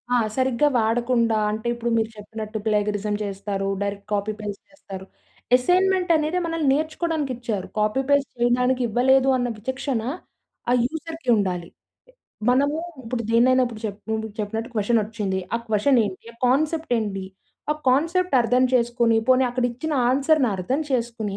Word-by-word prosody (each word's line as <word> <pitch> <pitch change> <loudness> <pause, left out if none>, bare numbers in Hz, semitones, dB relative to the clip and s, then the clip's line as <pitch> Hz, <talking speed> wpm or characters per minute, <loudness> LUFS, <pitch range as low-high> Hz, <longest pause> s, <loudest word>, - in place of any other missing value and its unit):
ఆ! - - +5 0.2
సరిగ్గా 260 +2 +2
వాడకుండా 230 0 +1
అంటే 220 +2 -4
ఇప్పుడు 235 0 -3
మీరు 220 0 0
చెప్పినట్టు 215 +1 -6
ప్లేగరిజం 210 -1 0
చేస్తారు. 195 0 -3
డైరెక్ట్ 200 0 -4
కాపీ 205 +1 0
పేస్ట్ 205 -2 -6
చేస్తారు. 195 -10 -10 0.5
అసైన్మెంట్ 365 +5 +2
అనేది 310 +4 0
మనల్ని 330 -3 -1
నేర్చుకోవడానికి 315 -1 -1
ఇచ్చారు. 220 -6 -3
కాపీ 215 +5 +1
పేస్ట్ 280 -2 +3
చేయడానికి 250 +2 +2
ఇవ్వలేదు 260 +4 +3
అన్న 245 -1 0
విచక్షణ, 260 +2 -3 0.7
ఆ - - +4
యూజర్‌కి 320 0 -5
ఉండాలి. 180 -4 -2 0.8
మనము 280 +4 +3 0.3
ఇప్పుడు 235 +1 -3
దేన్నైనా 255 +3 +4
ఇప్పుడు 230 -2 -8
చేప్ 205 -2 -4 0.4
చెప్పినట్టు 220 +3 -3
క్వెషన్ 225 +2 +2
వచ్చింది. 205 -3 -3
ఆ - - +4
క్వెషన్ 220 +5 +3
ఏంటి, 190 -2 -6
ఆ - - -25
కాన్సెప్ట్ 310 +3 +1
ఏంటి, 200 -3 -3 0.5
ఆ - - -5
కాన్సెప్ట్ 335 +6 +2
అర్థం 250 +2 +2
చేసుకొని, 235 -1 +2
పోనీ 260 0 +5
అక్కడ 245 0 -1
ఇచ్చిన 280 +7 -4 0.2
ఆన్సర్‌ని 275 -1 +3
అర్థం 250 - -1
చేసుకొని 230 -5 -2
240 Hz, 145 wpm, -23 LUFS, 210-270 Hz, 0.8 s, ఆ